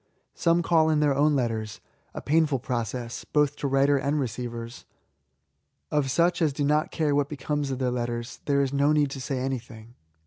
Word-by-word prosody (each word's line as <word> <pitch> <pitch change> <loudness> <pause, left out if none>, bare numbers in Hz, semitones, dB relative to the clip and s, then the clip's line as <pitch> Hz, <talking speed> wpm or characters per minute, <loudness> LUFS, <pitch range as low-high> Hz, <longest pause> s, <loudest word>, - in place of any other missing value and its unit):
Some 170 0 +2
call 160 -2 +3
in 155 -1 +2
their 150 -2 +3
own 145 +2 +3
letters 110 -4 -2
;— - - -40
« - - -9
painful 155 -2 +2
process, 120 -1 -4
both 150 -1 +1
to 140 - -2
writer 140 +1 +3
and 140 +2 0
receivers. 120 -2 -5 1.1
Of 150 -3 +1
such 170 +6 +2
as 155 -4 +2
do 145 - -2
not 150 +2 +2
care 155 -3 0
what 145 0 +1
becomes 145 0 -2
of 130 - -2
their 125 -1 0
letters, 120 0 -4
there 140 -1 +2
is 135 0 -2
no 140 +2 +3
need 145 -2 +2
to 135 - -6
say 135 +1 -3
anything. 120 -3 -5
140 Hz, 195 wpm, -26 LUFS, 125-150 Hz, 1.1 s, call